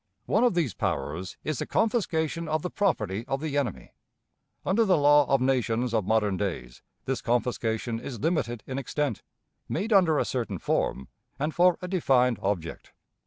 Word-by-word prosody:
One - - +2
of 245 -7 +3
these 160 -9 +1
powers 85 +5 -3
is 155 -4 -2
the - - -3
confiscation 170 -8 0
of 155 -1 -1
the 180 - -3
property 110 - 0
of 135 - -1
the 150 -1 -3
enemy. 120 - -2 0.7
Under 205 +5 +3
the 190 -5 +3
law 145 -1 +5
of 135 -2 +2
nations 125 -2 +1
of 110 -4 0
modern 105 -3 +2
days 75 -12 -4 0.2
this 130 -1 -2
confiscation 115 -1 -1
is 120 -1 -7
limited 120 - -1
in 130 0 -4
extent, 140 -2 -2 0.5
made 220 +3 -1
under 175 -6 +5
a - - +1
certain 115 -7 -2
form, 65 -4 -1 0.3
and 150 +3 -2
for 180 0 +4
a - - -3
defined 130 - +2
object. 95 -5 -3
130 Hz, 165 wpm, -27 LUFS, 110-160 Hz, 0.7 s, law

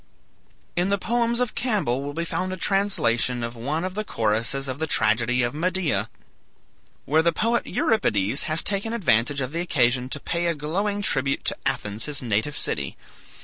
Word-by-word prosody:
In 180 +2 +1
the 200 - +2
poems 235 +3 0
of 250 -3 0
Campbell 200 - 0
will 145 +1 -5
be 170 +1 -2
found 185 +2 -2
a 185 - -4
translation 130 - +1
of 115 +1 -4
one 145 +8 -2
of 185 0 -3
the 215 +2 -2
choruses 115 - 0
of 130 +1 -4
the 160 - -1
tragedy 115 +1 +2
of 120 - -1
"Medea," 160 - 0 1.0
where 155 +3 +3
the 170 +1 +3
poet 230 +7 0
Euripides 110 - +1
has 155 +1 +2
taken 205 +3 0
advantage 140 - +2
of 130 0 -3
the 165 +2 -2
occasion 125 -6 +1
to 140 - -4
pay 170 +3 -1
a 170 - +1
glowing 200 +8 -2
tribute 135 -6 0
to - - +2
Athens, 105 +2 -2
his 150 -2 -3
native 115 +4 -1
city. - - 0
150 Hz, 180 wpm, -24 LUFS, 120-190 Hz, 1.0 s, where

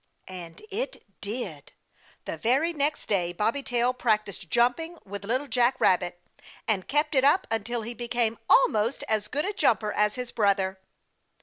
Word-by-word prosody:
And 170 - -9
it 465 +6 -4 0.2
did. 200 - -5 0.5
The - - -3
very 275 - +2
next 295 0 -1
day 175 -4 0
Bobby 225 +9 0
Tail 245 -1 +1
practiced 215 -7 -1
jumping 285 +9 +1
with 200 0 -7
Little 255 +7 0
Jack 245 +1 +2
Rabbit, 175 -1 +2 0.5
and 200 -4 0
kept 295 +2 +1
it 265 -2 +4
up 300 +8 +4
until 225 +1 -1
he 235 +2 -5
became 235 -1 -1
almost 220 +4 +4
as 215 -1 0
good 295 +5 -1
a 410 - -2
jumper 215 - +2
as 210 0 +2
his 250 -1 -5
brother. 195 -3 +1
235 Hz, 160 wpm, -27 LUFS, 200-260 Hz, 0.5 s, it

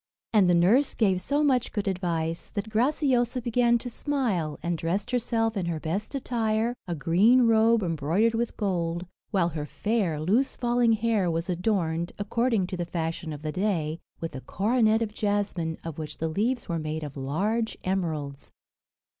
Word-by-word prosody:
And 200 -4 +5
the 175 - +5
nurse 215 +12 +4
gave 190 -5 +2
so 285 +9 +1
much 255 -4 +2
good 205 -2 -2
advice, 170 -3 -2
that 215 +1 -4
Graciosa 250 0 +2
began 240 0 +2
to 240 - -6
smile, 225 - -1
and 170 0 0
dressed 190 +8 -2
herself 225 -2 0
in 185 -4 -1
her 165 -2 -2
best 195 - -3
attire, 230 -3 0
a 175 - -2
green 210 - +4
robe 225 -1 +4
embroidered 170 +7 +1
with 235 +1 -2
gold; 175 -4 -1 0.2
while 185 -5 +2
her 150 -2 -5
fair, 200 -8 -1
loose 215 - +1
falling 240 -1 +2
hair 220 -4 +1
was 165 +2 -1
adorned, 170 -3 -1
according 225 0 +1
to 185 0 -5
the 175 - -1
fashion 165 -1 -3
of 150 0 -7
the 155 - -2
day, 170 -4 -1 0.2
with 165 - -5
a 130 - -6
coronet 220 - +2
of 210 -2 -5
jasmine, 205 -6 -1
of 165 -2 -6
which 155 -1 -6
the 160 - -2
leaves 230 +9 -1
were 170 -3 -1
made 155 0 -3
of 145 -2 -7
large 200 +12 -1
emeralds. 155 -7 -3
195 Hz, 170 wpm, -27 LUFS, 165-230 Hz, 0.2 s, And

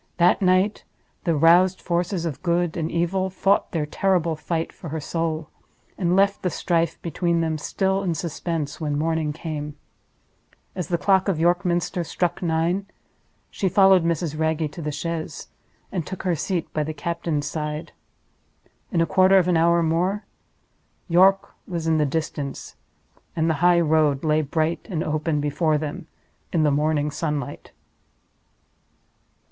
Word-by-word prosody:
That 175 +3 +4
night 185 +2 +2 0.4
the 170 -2 +2
roused 175 +5 +5
forces 175 0 -1
of 150 -5 -4
Good 175 -1 0
and 160 -1 -2
Evil 185 +3 0
fought 195 +1 +1
their 160 -3 -1
terrible 170 0 +1
fight 165 +1 -3
for 170 - -9
her 160 +2 -3
soul—and 165 +3 -4
left 200 +1 +3
the 180 - 0
strife 165 -1 0
between 170 +1 0
them 160 -1 -1
still 190 +4 0
in 175 -4 -1
suspense 160 -2 -4
when 145 -2 -1
morning 160 0 0
came. 150 -1 -6 1.0
As 180 -4 -4
the 170 - 0
clock 190 +2 +2
of 185 -5 0
York 175 +2 +2
Minster 175 -1 0
struck 175 +1 -2
nine, 170 +3 0 0.6
she 190 - -1
followed 190 -2 +5
Mrs. 165 -2 -1
Wragge 160 -1 0
to 170 - -8
the 150 -1 -3
chaise, 165 +2 -5 0.4
and 180 -4 -2
took 190 - -6
her 180 -2 +1
seat 175 +2 -3
by 155 - 0
the 155 +1 -5
captain's 165 -1 -2
side. 155 +1 -4 1.0
In 170 -5 +2
a - - +4
quarter 190 +2 +5
of 180 -2 +3
an 180 - +2
hour 170 +1 +4
more 180 +6 0 0.8
York 190 +3 +4
was 170 -3 -4
in 160 -1 +2
the 150 - +2
distance, 145 -2 -4 0.6
and 160 0 +1
the 160 - +2
highroad 160 -5 +3
lay 155 0 +2
bright 155 +3 -1
and 165 -4 -1
open 155 0 -1
before 150 +2 +1
them 155 +3 -5 0.4
in 165 -3 +2
the 150 - +3
morning 150 0 +1
sunlight. 150 -3 -4
165 Hz, 150 wpm, -23 LUFS, 155-180 Hz, 1.0 s, roused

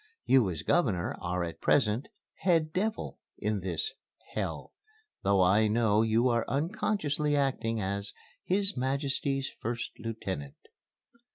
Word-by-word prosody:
You 130 -7 +5
as 80 -3 -4
Governor 105 - +1
are 90 0 -1
at 85 -1 -6
present 115 -1 +2 0.3
'head 165 -4 +2
devil' 215 +4 -2 0.2
in 105 -1 -1
this 95 - -2 0.4
'hell,' - - -3 0.5
though 100 -1 +3
I 105 +4 +4
know 110 -1 +3
you 115 +2 +3
are 115 -2 +2
unconsciously 150 -2 0
acting 130 -5 0
as 100 +1 -2 0.3
'His 195 +2 +1
Majesty's' 135 +1 0
1st 120 +1 -2
Lieutenant." 95 -11 -4
115 Hz, 120 wpm, -30 LUFS, 100-145 Hz, 0.5 s, You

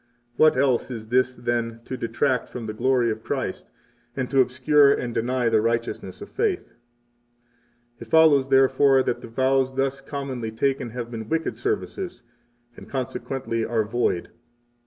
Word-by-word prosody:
What 155 -1 +5
else 130 -2 +2
is 110 -3 -7
this 130 +1 +3
than 120 -1 -2
to 130 - -5
detract 125 +2 -1
from 120 -2 -7
the 110 - -4
glory 120 0 +2
of 110 0 -6
Christ - - -4 0.5
and 130 -1 -1
to 135 -1 +5
obscure 140 +3 +4
and 120 -3 -1
deny 125 +2 0
the 110 -1 +3
righteousness 115 +1 -2
of - - -8
faith? 410 -5 0
39 - - -31 1.2
It 115 - -9
follows, 145 -1 +5
therefore, 135 0 +4
that 120 - -2
the - - -9
vows 130 +2 +1
thus 135 0 -1
commonly 135 -4 -5
taken 125 +2 -1
have 120 0 -6
been 110 -2 -6
wicked 165 0 -1
services, 400 -3 -3 0.5
and, - - -13
consequently, 130 -2 -3
are 115 -1 0
void. 105 -5 -1
130 Hz, 155 wpm, -24 LUFS, 115-135 Hz, 1.2 s, What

